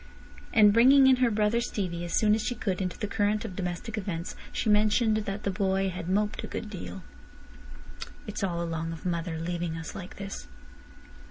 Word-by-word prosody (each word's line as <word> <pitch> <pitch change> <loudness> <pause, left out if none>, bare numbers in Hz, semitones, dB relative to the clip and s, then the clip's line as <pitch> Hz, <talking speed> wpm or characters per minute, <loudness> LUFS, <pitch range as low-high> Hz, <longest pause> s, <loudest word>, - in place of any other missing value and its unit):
And 210 -2 +6
bringing 265 +4 +7
in 260 -1 +6
her 250 -1 +3
brother 215 +2 +2
Stevie 180 -7 -3
as 170 - -2
soon 210 -1 +4
as 220 - +1
she 245 - -1
could 195 -4 -2
into 185 -1 -3
the 210 - -3
current 210 +1 0
of 185 - -6
domestic 195 +5 -3
events, 175 -4 -4 0.2
she - - -2
mentioned 215 +1 +3
that 205 -1 -4
the 200 - 0
boy 195 0 +1
had 175 -1 -5
moped 210 +2 0
a - - -4
good 210 - -5
deal. 190 -1 -7 1.2
"It's 210 -2 -5
all 170 -3 -1
along 165 0 -3
of 165 - -10
mother 170 -2 -2
leaving 170 0 -3
us 160 - -6
like 185 -2 -8
this." 195 - -7
195 Hz, 190 wpm, -28 LUFS, 175-215 Hz, 1.2 s, bringing